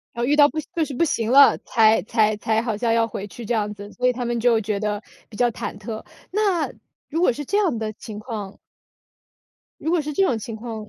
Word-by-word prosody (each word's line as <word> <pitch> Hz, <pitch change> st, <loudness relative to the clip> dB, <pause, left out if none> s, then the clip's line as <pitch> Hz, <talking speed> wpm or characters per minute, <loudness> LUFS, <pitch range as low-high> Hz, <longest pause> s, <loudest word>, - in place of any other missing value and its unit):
啊， 235 Hz, -, -2 dB
遇 275 Hz, -, +2 dB
到 290 Hz, -1 st, +8 dB
不 315 Hz, -, -7 dB
行 -, -, -19 dB
就 325 Hz, -2 st, +1 dB
是 285 Hz, -, -7 dB
不 270 Hz, -, +1 dB
行 230 Hz, -8 st, 0 dB
了， 275 Hz, +3 st, +7 dB
才 220 Hz, -2 st, +4 dB
才 215 Hz, 0 st, +2 dB
才 220 Hz, +1 st, 0 dB
好 225 Hz, -3 st, -2 dB
像 230 Hz, 0 st, +1 dB
要 230 Hz, 0 st, +3 dB
回 205 Hz, -2 st, -6 dB
去 235 Hz, +3 st, -9 dB
这 240 Hz, -, -1 dB
样 210 Hz, -2 st, -1 dB
子。 205 Hz, 0 st, -10 dB
所 250 Hz, +1 st, 0 dB
以 250 Hz, -, +3 dB
他 245 Hz, 0 st, -4 dB
们 235 Hz, 0 st, -1 dB
就 230 Hz, -1 st, +3 dB
觉 210 Hz, -1 st, -2 dB
得 210 Hz, 0 st, -2 dB, 0.2 s
比 215 Hz, -, -14 dB
较 240 Hz, +1 st, +2 dB
忐 210 Hz, -, -6 dB
忑， 215 Hz, +2 st, -7 dB, 0.3 s
那， 395 Hz, -5 st, +1 dB, 0.4 s
如 320 Hz, -, -2 dB
果 355 Hz, -, +3 dB
是 290 Hz, +5 st, -5 dB
这 405 Hz, -, 0 dB
样 360 Hz, -, +1 dB
的 220 Hz, -1 st, -3 dB
情 210 Hz, 0 st, -9 dB
况。 210 Hz, -3 st, -6 dB, 1.2 s
如 320 Hz, -, -1 dB
果 340 Hz, -3 st, +2 dB
是 300 Hz, 0 st, -5 dB
这 390 Hz, -, +2 dB
种 250 Hz, -11 st, +2 dB
情 225 Hz, +1 st, -6 dB
况。 220 Hz, -1 st, -7 dB
230 Hz, 265 characters per minute, -23 LUFS, 215-280 Hz, 1.2 s, 到